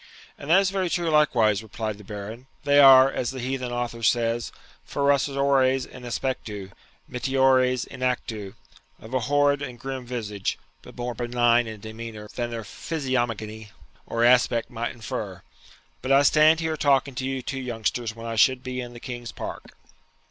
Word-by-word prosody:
'And 140 Hz, -, -10 dB
that 180 Hz, +4 st, +7 dB
is 195 Hz, -1 st, +1 dB
very 190 Hz, -2 st, -1 dB
true 170 Hz, -1 st, 0 dB
likewise,' 115 Hz, -9 st, +3 dB
replied 110 Hz, -1 st, -5 dB
the -, -, -12 dB
Baron; 105 Hz, +5 st, -8 dB, 0.2 s
'they 145 Hz, 0 st, +4 dB
are, 135 Hz, -1 st, +8 dB
as 120 Hz, -, -2 dB
the 135 Hz, -, -6 dB
heathen 125 Hz, 0 st, -3 dB
author 120 Hz, -1 st, -3 dB
says, 115 Hz, 0 st, +1 dB, 0.3 s
ferociores 140 Hz, -2 st, +2 dB
in 125 Hz, -, -12 dB
aspectu, 115 Hz, -5 st, -4 dB, 0.4 s
mitiores 130 Hz, 0 st, +2 dB
in -, -, -11 dB
actu, 110 Hz, -6 st, -2 dB, 0.4 s
of 110 Hz, +3 st, -12 dB
a 130 Hz, -, +2 dB
horrid 145 Hz, 0 st, +3 dB
and 125 Hz, -4 st, -6 dB
grim 135 Hz, 0 st, -5 dB
visage, 105 Hz, -5 st, -3 dB, 0.2 s
but -, -, -14 dB
more 120 Hz, 0 st, -3 dB
benign 120 Hz, 0 st, +2 dB
in 110 Hz, -2 st, -8 dB
demeanour 110 Hz, -1 st, -8 dB
than 120 Hz, -1 st, -3 dB
their 115 Hz, -1 st, -5 dB
physiognomy 115 Hz, -6 st, -3 dB, 0.4 s
or 115 Hz, 0 st, 0 dB
aspect 120 Hz, -1 st, +3 dB
might 120 Hz, 0 st, -3 dB
infer. 105 Hz, -5 st, -6 dB, 0.6 s
But 130 Hz, -, -2 dB
I 135 Hz, +1 st, +6 dB
stand 155 Hz, +3 st, +5 dB
here 160 Hz, -1 st, -1 dB
talking 140 Hz, -1 st, +2 dB
to 125 Hz, -, -4 dB
you 135 Hz, -1 st, -3 dB
two 135 Hz, +1 st, -4 dB
youngsters 115 Hz, -2 st, -2 dB
when 115 Hz, 0 st, -9 dB
I 115 Hz, -1 st, -4 dB
should 130 Hz, +3 st, +4 dB
be 125 Hz, -1 st, -4 dB
in 120 Hz, -1 st, -8 dB
the 120 Hz, -, -10 dB
King's 120 Hz, -1 st, -7 dB
Park.' -, -, -8 dB
125 Hz, 170 wpm, -25 LUFS, 115-135 Hz, 0.6 s, are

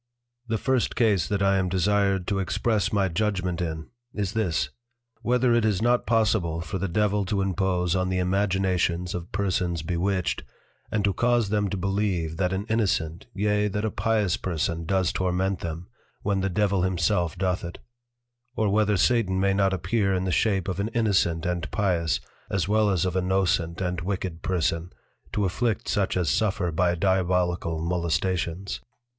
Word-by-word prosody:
The 115 Hz, -1 st, 0 dB
First 130 Hz, -1 st, 0 dB
Case 105 Hz, -8 st, +2 dB
that 100 Hz, -1 st, 0 dB
I 95 Hz, 0 st, +3 dB
am 90 Hz, -1 st, 0 dB
desired 95 Hz, 0 st, +1 dB
to 100 Hz, +1 st, -1 dB
express 105 Hz, +4 st, 0 dB
my 100 Hz, -3 st, +2 dB
Judgment 95 Hz, -1 st, -1 dB
in, 80 Hz, -2 st, -4 dB, 0.2 s
is 100 Hz, -2 st, -2 dB
this, 85 Hz, -9 st, 0 dB, 0.5 s
_Whether 125 Hz, 0 st, +3 dB
it 120 Hz, -, +3 dB
is 105 Hz, -4 st, +2 dB
not 120 Hz, +2 st, +2 dB
Possible 105 Hz, -8 st, +2 dB
for 85 Hz, +3 st, -4 dB
the 95 Hz, -, -1 dB
Devil 105 Hz, +3 st, +1 dB
to 100 Hz, +2 st, -1 dB
impose 95 Hz, -2 st, 0 dB
on 95 Hz, 0 st, 0 dB
the 95 Hz, -, 0 dB
imaginations 90 Hz, -2 st, 0 dB
of 90 Hz, 0 st, -6 dB
Persons 90 Hz, -4 st, -1 dB
Bewitched, 90 Hz, +2 st, -1 dB, 0.5 s
and 105 Hz, -2 st, 0 dB
to 100 Hz, -1 st, +2 dB
cause 120 Hz, +1 st, +2 dB
them 105 Hz, -1 st, +1 dB
to 100 Hz, -, -3 dB
Believe 95 Hz, -4 st, -1 dB
that 90 Hz, 0 st, +1 dB
an 95 Hz, +2 st, -2 dB
Innocent, 95 Hz, -6 st, 0 dB
yea 105 Hz, +1 st, +1 dB
that 105 Hz, +2 st, -2 dB
a 110 Hz, -, -1 dB
Pious 105 Hz, -3 st, +1 dB
person 85 Hz, -1 st, -2 dB
does 95 Hz, -2 st, +2 dB
torment 95 Hz, +1 st, 0 dB
them, 85 Hz, +2 st, -5 dB, 0.4 s
when 100 Hz, -2 st, +1 dB
the 95 Hz, -, 0 dB
Devil 100 Hz, 0 st, +1 dB
himself 90 Hz, -1 st, +1 dB
doth 95 Hz, -1 st, 0 dB
it; 85 Hz, 0 st, -6 dB, 0.8 s
or 110 Hz, -4 st, +1 dB
whether 105 Hz, 0 st, +2 dB
Satan 95 Hz, -2 st, +2 dB
may 100 Hz, 0 st, +2 dB
not 95 Hz, -1 st, +2 dB
appear 95 Hz, +2 st, 0 dB
in 90 Hz, -, -1 dB
the 95 Hz, -, -1 dB
Shape 95 Hz, 0 st, +1 dB
of 95 Hz, -1 st, -2 dB
an 100 Hz, -, 0 dB
Innocent 95 Hz, -7 st, +2 dB
and 90 Hz, 0 st, -2 dB
Pious, 90 Hz, -6 st, +1 dB, 0.3 s
as 95 Hz, -3 st, 0 dB
well 105 Hz, 0 st, +3 dB
as 95 Hz, -3 st, +1 dB
of 90 Hz, -1 st, -2 dB
a 95 Hz, -, +2 dB
Nocent 90 Hz, -2 st, 0 dB
and 90 Hz, -1 st, -2 dB
Wicked 90 Hz, -2 st, -3 dB
Person, 85 Hz, -1 st, -1 dB, 0.4 s
to 105 Hz, -, 0 dB
Afflict 110 Hz, +4 st, -1 dB
such 95 Hz, -2 st, 0 dB
as 90 Hz, -3 st, 0 dB
suffer 95 Hz, -1 st, 0 dB
by 90 Hz, +2 st, +2 dB
Diabolical 90 Hz, -2 st, +1 dB
Molestations? 90 Hz, +1 st, -1 dB
95 Hz, 175 wpm, -26 LUFS, 90-105 Hz, 0.8 s, I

